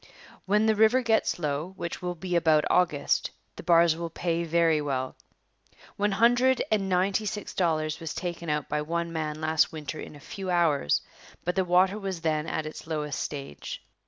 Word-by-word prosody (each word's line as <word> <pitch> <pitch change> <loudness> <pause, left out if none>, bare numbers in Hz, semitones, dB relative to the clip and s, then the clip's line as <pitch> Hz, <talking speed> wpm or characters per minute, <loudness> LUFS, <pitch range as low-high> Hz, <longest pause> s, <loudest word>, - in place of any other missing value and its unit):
When 210 +3 +3
the 220 - +4
river 220 +4 +4
gets 225 -2 +2
low, 155 +3 -3
which 170 - -5
will 180 0 -3
be 180 +1 -3
about 160 -3 +4
August, 155 -6 +2 0.3
the - - -8
bars 170 -1 +5
will 170 0 -4
pay 170 0 -1
very 165 -2 +2
well. 130 -3 -2 0.8
One 205 0 +1
hundred 245 +4 +4
and 200 -3 +1
ninety 190 +3 +1
six 210 0 -5
dollars 155 -3 0
was 165 -3 -5
taken 170 -2 -4
out 150 -1 -1
by 150 0 -1
one 170 +2 -2
man 155 -1 -3
last 155 0 +2
winter 155 -1 -6
in - - -8
a - - -12
few 190 +6 -7
hours, 160 - +2 0.4
but 180 - 0
the 190 -1 +1
water 185 +3 +3
was 190 -4 -4
then 155 -1 0
at 160 - -2
its 155 +1 -8
lowest 150 -3 -3
stage. 140 - -6
170 Hz, 185 wpm, -27 LUFS, 155-190 Hz, 0.8 s, bars